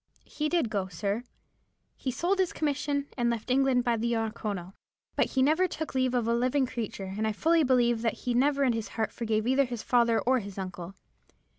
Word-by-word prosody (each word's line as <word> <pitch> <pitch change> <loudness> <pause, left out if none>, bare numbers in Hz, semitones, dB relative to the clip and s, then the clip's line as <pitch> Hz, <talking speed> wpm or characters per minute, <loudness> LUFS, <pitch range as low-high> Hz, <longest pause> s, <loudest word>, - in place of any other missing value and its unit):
"He 305 0 -2
did 320 -10 +1
go, 195 -3 -1
sir,—he 205 +7 -7
sold 355 +9 0
his 370 -2 +1
commission, 290 -1 -1
and 240 0 +2
left 235 +1 -2
England 260 -1 +3
by 240 -2 +1
the 235 +2 0
Oronoko. 210 -5 -3 0.4
But - - +2
he 260 - +1
never 320 +7 +3
took 315 -3 -5
leave 255 -1 +1
of 240 -2 +1
a 230 - +2
living 255 +3 +2
creature, 210 -6 -5
and 220 +1 0
I 220 - 0
fully 325 +9 +3
believe 240 -3 +3
that 230 -2 0
he 245 - +1
never 280 +3 +2
in 255 -3 +3
his 225 -2 -3
heart 220 -1 0
forgave 220 -2 -1
either 265 +3 +3
his 240 -3 -5
father 235 -2 +3
or 260 +1 +2
his 200 -3 -9
uncle. 185 -1 -6
240 Hz, 200 wpm, -28 LUFS, 220-270 Hz, 0.4 s, England